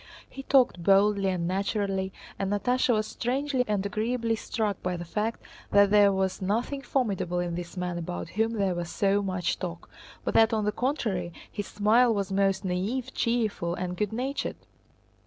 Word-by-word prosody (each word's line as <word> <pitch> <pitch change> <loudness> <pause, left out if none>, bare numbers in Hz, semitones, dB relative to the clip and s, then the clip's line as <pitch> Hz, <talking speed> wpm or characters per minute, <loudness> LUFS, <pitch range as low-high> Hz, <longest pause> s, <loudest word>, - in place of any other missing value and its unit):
He 270 - -8
talked 260 -9 +3
boldly 195 +1 +4
and 175 -2 -1
naturally, 195 0 -1 0.3
and 195 0 -1
Natásha 245 +5 +2
was 215 -2 +2
strangely 260 +3 -1
and 205 -2 0
agreeably 225 +2 0
struck 215 -2 -2
by 180 -1 -2
the 175 - -6
fact 215 +6 -2 0.3
that 200 0 +5
there 205 -1 +6
was 190 0 -1
nothing 230 +8 -1
formidable 195 -11 -1
in 175 -1 -1
this 175 +2 -6
man 180 -1 -2
about 90 - -5
whom 225 +2 0
there 200 -4 +1
was 175 -1 -4
so 200 +2 +2
much 185 -3 -1
talk, 170 -2 -6 0.3
but - - -2
that 225 +1 +5
on 215 -2 +1
the 210 - +2
contrary 210 - -1 0.2
his 205 -2 -4
smile 225 +4 +4
was 200 -1 -2
most 195 0 +1
naïve, 215 +9 -2
cheerful, 215 -7 0
and 180 0 -3
good 210 +2 -1
natured. 260 +5 -2
200 Hz, 175 wpm, -27 LUFS, 185-225 Hz, 0.3 s, there